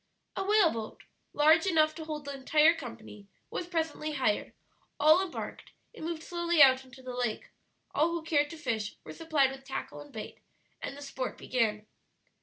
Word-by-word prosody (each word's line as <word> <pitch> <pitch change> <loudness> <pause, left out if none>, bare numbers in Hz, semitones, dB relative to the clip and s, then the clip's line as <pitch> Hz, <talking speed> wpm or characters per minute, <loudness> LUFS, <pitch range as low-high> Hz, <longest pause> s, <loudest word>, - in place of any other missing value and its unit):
A 385 - -1
whaleboat, 350 - +2 0.3
large 315 +4 +5
enough 310 -3 +4
to 320 0 -8
hold 305 -2 -5
the 280 - -4
entire 300 +4 +4
company, 230 -8 -10 0.2
was 345 - -4
presently 320 -3 -2
hired; 260 -7 0 0.5
all 310 +5 +6
embarked; 370 - -7 0.2
it 465 - -12
moved 325 0 -4
slowly 345 -1 -1
out 265 -2 +7
into 260 0 -15
the 255 -1 -6
lake; 245 -3 -2 0.4
all 310 +3 +3
who 335 -1 -3
cared 295 -2 +2
to 330 - -8
fish 225 -7 -2
were - - -9
supplied 310 -5 +2
with 270 0 -10
tackle 145 - -6
and 145 - -13
bait, 220 - -8 0.4
and 275 - -5
the 285 - -8
sport 265 -2 -4
began. 215 -4 0
295 Hz, 175 wpm, -30 LUFS, 255-325 Hz, 0.5 s, out